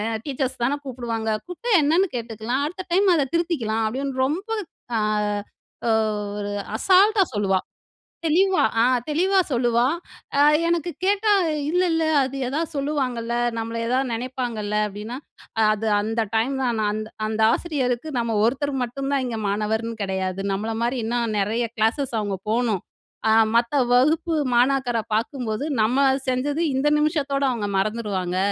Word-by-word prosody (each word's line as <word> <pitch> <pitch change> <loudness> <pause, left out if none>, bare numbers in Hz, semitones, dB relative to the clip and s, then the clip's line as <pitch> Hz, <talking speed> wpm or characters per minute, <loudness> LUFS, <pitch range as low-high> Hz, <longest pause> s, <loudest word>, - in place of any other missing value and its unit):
அ - - -1
teachers 265 -3 -3
தான 275 +4 +1
கூப்டுவாங்க. 235 -4 -3 0.2
கூப்டா 405 +7 -4
என்னன்னு 330 +7 +3
கேட்டுக்கலாம். 235 +3 -2
அடுத்த 370 +4 -7
டைம் 385 0 +4
அத 280 -3 +1
திருத்திக்கலாம்" 255 -11 0
அப்டின்னு 260 +2 -2
ரொம்ப 360 +11 -3 0.5
அ - - +1 0.9
ஓ - - +3 0.5
ஒரு 205 0 -3 0.3
அசால்ட்டா 390 - +5
சொல்லுவா. 195 -2 +2 0.7
தெளிவா, 370 +4 +3 0.2
அ - - +5 0.3
தெளிவா 375 +6 +2
சொல்லுவா. 240 -1 +2 0.5
அ - - +5 0.3
எனக்கு 340 0 0
கேட்டா, 410 +2 +2 0.4
"இல்ல 360 +3 +2
இல்ல 325 0 +1 0.2
அது 265 +1 -4
ஏதாவது 305 +5 -2
சொல்லுவாங்கல்ல, 260 -5 -1 0.2
நம்மள 230 +1 -3
எதாவது 255 +1 0
நினைப்பாங்கல்ல?" 235 -3 -3
அப்டின்னா. 210 +5 -7 0.5
"அது 215 +1 -1
அந்த 225 +2 -1
டைம் 230 +5 +1
தான் 240 -3 0
நான் 210 - +1
அந்த 215 0 -4 0.2
அந்த 220 0 -2
ஆசிரியருக்கு 265 -5 -1
நம்ம 230 -1 -1
ஒருத்தர் 275 +5 0
மட்டும் 270 +3 -4
தான் 275 - +2
இங்க 235 -3 -3
மாணவர்ன்னு 220 +3 -1
கிடையாது 190 0 -2
நம்மள 210 +3 -2
மாரி 240 +2 0
இன்னும் 230 -1 -1
நிறைய 225 +4 0
கிளாஸஸ் 230 +3 0
அவங்க 205 -2 -2
போணும். 225 -4 +1 0.5
அ - - +5 0.2
மத்த 235 +3 +2 0.2
வகுப்பு 310 +6 +3 0.2
மாணாக்கர 250 -1 +2 0.2
பாக்கும்போது 230 +2 -2 0.2
நம்ம 230 +5 +2 0.3
செஞ்சது 285 +5 0
இந்த 270 +3 +1
நிமிஷத்தோட 285 -3 0
அவங்க 215 -4 -2
மறந்துடுவாங்க. 195 -4 -2
245 Hz, 140 wpm, -23 LUFS, 220-290 Hz, 0.9 s, அசால்ட்டா